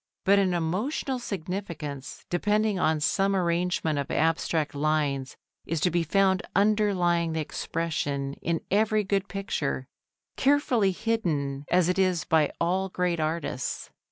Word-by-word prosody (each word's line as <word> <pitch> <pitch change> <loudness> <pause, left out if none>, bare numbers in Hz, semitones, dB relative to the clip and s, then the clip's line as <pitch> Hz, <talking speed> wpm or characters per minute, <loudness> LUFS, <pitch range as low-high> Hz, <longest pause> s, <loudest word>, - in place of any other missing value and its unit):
But 200 +1 +5
an 185 -2 +2
emotional 215 - -1
significance 170 - -5
depending 210 +2 +1
on 155 -3 +2
some 195 +5 +2
arrangement 170 -3 0
of 140 - -3
abstract 160 -1 +1
lines 145 -2 0 0.3
is 165 0 -1
to 180 - +2
be 175 +1 +2
found 190 +3 +2
underlying 195 -5 +2
the 160 - -1
expression 145 -3 -2
in 165 -1 -1
every 215 +1 +3
good 195 0 0
picture, 160 -9 -2 0.5
carefully 265 -8 +3
hidden 155 -11 -1
as 180 -1 +4
it 180 +2 +1
is 185 -3 +2
by 155 -2 +2
all 185 +3 0
great 180 -2 -1
artists. 155 -5 -3
175 Hz, 130 wpm, -27 LUFS, 155-195 Hz, 0.5 s, But